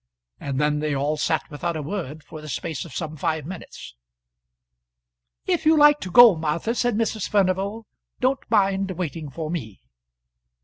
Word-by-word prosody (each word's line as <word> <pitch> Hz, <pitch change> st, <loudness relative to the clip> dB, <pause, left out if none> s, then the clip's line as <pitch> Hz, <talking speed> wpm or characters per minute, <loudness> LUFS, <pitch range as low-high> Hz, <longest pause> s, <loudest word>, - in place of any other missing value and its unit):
And 135 Hz, -1 st, -3 dB
then 150 Hz, 0 st, +1 dB
they 150 Hz, -1 st, -1 dB
all 145 Hz, +3 st, 0 dB
sat 155 Hz, +1 st, -1 dB
without 160 Hz, +3 st, -3 dB
a 155 Hz, -, -4 dB
word 155 Hz, -3 st, -5 dB
for 155 Hz, +1 st, -10 dB
the 155 Hz, -, -9 dB
space 155 Hz, +4 st, -4 dB
of 160 Hz, -, -11 dB
some 155 Hz, -2 st, -4 dB
five 155 Hz, -1 st, -2 dB
minutes. 175 Hz, -, -9 dB, 1.5 s
"If 355 Hz, -3 st, 0 dB
you 315 Hz, 0 st, +5 dB
like 295 Hz, 0 st, +6 dB
to 185 Hz, -, -6 dB
go, 230 Hz, +2 st, +8 dB
Martha," 160 Hz, +8 st, -1 dB
said 245 Hz, -2 st, 0 dB
Mrs. 220 Hz, -2 st, -1 dB
Furnival, 200 Hz, +2 st, 0 dB, 0.3 s
"don't 260 Hz, +1 st, 0 dB
mind 195 Hz, -2 st, +2 dB
waiting 165 Hz, -4 st, -4 dB
for 155 Hz, +3 st, -5 dB
me." 110 Hz, -, -5 dB
170 Hz, 165 wpm, -23 LUFS, 150-210 Hz, 1.5 s, go